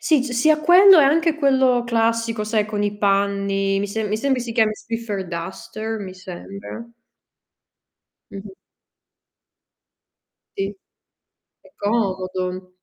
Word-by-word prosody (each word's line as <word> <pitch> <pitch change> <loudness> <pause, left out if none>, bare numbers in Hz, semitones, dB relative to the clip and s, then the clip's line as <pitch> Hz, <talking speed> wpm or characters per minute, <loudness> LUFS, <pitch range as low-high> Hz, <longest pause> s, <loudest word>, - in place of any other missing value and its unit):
Sì, 305 -5 +2
ci 265 - -5
sia 305 +5 +3
quello 360 +4 +7
e - - +5
anche 320 +3 +2
quello 265 -5 +2
classico, 230 -1 0
sai 215 0 0
con 210 -1 -3
i 205 0 -2
panni. 200 -1 0
Mi 205 - -2
se 220 +2 -3
mi 210 +1 -1
sembri 265 +2 0
si 235 -1 -5
chiami 220 -2 +2
Swiffer 220 -4 -5
Duster, 190 +6 -6
mi 190 -3 -8
sembra. 195 +4 -9 1.4
Mh-mh. 195 0 -10 2.0
Sì. 195 +1 -3 0.9
È - - -21
comodo. 185 -3 -2
215 Hz, 120 wpm, -21 LUFS, 195-245 Hz, 2.0 s, quello